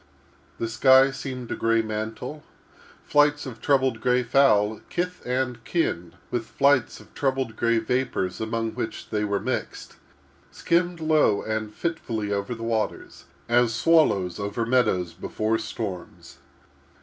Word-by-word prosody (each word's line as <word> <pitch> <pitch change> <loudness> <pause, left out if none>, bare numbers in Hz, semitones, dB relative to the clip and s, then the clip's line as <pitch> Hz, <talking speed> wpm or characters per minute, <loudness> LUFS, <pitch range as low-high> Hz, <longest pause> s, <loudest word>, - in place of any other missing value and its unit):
The 115 - -2
sky 130 +4 +5
seemed 130 -3 -6
a - - -1
gray 115 0 +2
surtout. 110 +7 -5 0.6
Flights 145 0 +3
of 120 -4 -8
troubled 130 -5 +2
gray 125 0 +2
fowl, 110 -5 +3
kith 180 +1 -3
and 125 -2 -2
kin 90 - -2 0.2
with 120 -2 -2
flights 140 -4 +2
of - - -18
troubled 130 -4 -1
gray 115 0 +2
vapors 110 -5 -1
among 115 0 -2
which 110 - -6
they 105 -1 0
were 100 -1 0
mixed, - - -4 0.5
skimmed 175 0 0
low 155 -10 +3
and 110 -1 -3
fitfully 115 -9 -3
over 100 +4 -2
the 115 - -8
waters, 115 -1 -3 0.2
as 120 -1 +3
swallows 110 - +3
over 100 +3 -2
meadows 95 -9 +1
before 110 +6 -2
storms. 110 -5 -7
115 Hz, 135 wpm, -25 LUFS, 110-135 Hz, 0.6 s, sky